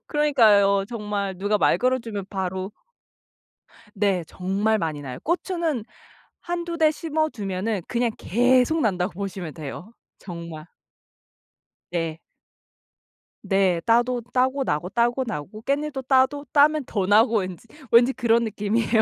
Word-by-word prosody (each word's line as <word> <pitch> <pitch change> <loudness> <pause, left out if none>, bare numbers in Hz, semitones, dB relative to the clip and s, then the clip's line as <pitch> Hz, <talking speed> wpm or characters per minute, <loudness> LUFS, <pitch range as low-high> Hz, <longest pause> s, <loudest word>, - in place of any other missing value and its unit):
그러니까요. 215 -10 +4
정말 205 -4 -3
누가 205 +2 +1
말 - - +3
걸어 255 +1 +2
주면 220 -5 -6
바로 190 0 -4 1.2
네. 195 -3 +1
정말 200 +4 0
많이 155 -6 -3
나요. 130 -3 -7
고추는 335 - -1 0.6
1-2 345 -1 -4
대 315 -2 +4
심어 315 0 -1
두면은 200 -2 -3
그냥 240 -1 0
계속 250 - +2
난다고 185 -4 0
보시면 185 -4 -5
돼요, 165 +8 -8 0.3
정말. 170 -4 -8 1.3
네. 165 -2 -2 1.2
네. 195 -3 +2
따도 240 +2 +2
따고 260 +2 +2
나고 165 - -2
따고 240 +5 +1
나고 185 +3 -6
깻잎도 280 -1 -2
따도 275 +2 +3
따면 300 +1 +4
더 200 -5 -1
나고 220 +3 +4
왠지 185 +3 -6 0.2
왠지 240 +2 +6
그런 235 -2 +2
느낌이에요. 220 +1 +1
220 Hz, 250 characters per minute, -24 LUFS, 190-260 Hz, 1.3 s, 왠지